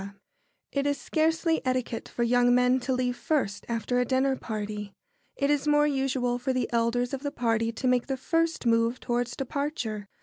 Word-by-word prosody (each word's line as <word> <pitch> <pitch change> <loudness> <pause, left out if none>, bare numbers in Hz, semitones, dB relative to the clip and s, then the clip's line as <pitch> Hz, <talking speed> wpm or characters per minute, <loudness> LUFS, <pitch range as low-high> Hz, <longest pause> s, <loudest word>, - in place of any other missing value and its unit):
] - - -45 0.3
It 280 0 0
is 285 0 0
scarcely 320 +1 +1
etiquette 255 -3 -2
for 240 - -2
young 245 +1 +4
men 250 +1 +4
to 260 +1 -1
leave 250 -1 0
first 245 -10 -1
after 235 +2 0
a - - +3
dinner 265 +2 +1
party. 210 -3 -5 0.4
It 280 +1 +1
is 290 0 +1
more 295 0 +4
usual 265 -3 0
for 260 +1 -1
the 255 -2 0
elders 235 +2 +1
of 270 - -3
the 285 - -2
party 230 -3 0
to 255 - -2
make 250 -1 +2
the 270 -1 -2
first 330 +2 0
move 230 +1 +2
towards 240 0 -2
departure. 260 -7 -3
250 Hz, 190 wpm, -27 LUFS, 235-275 Hz, 0.4 s, young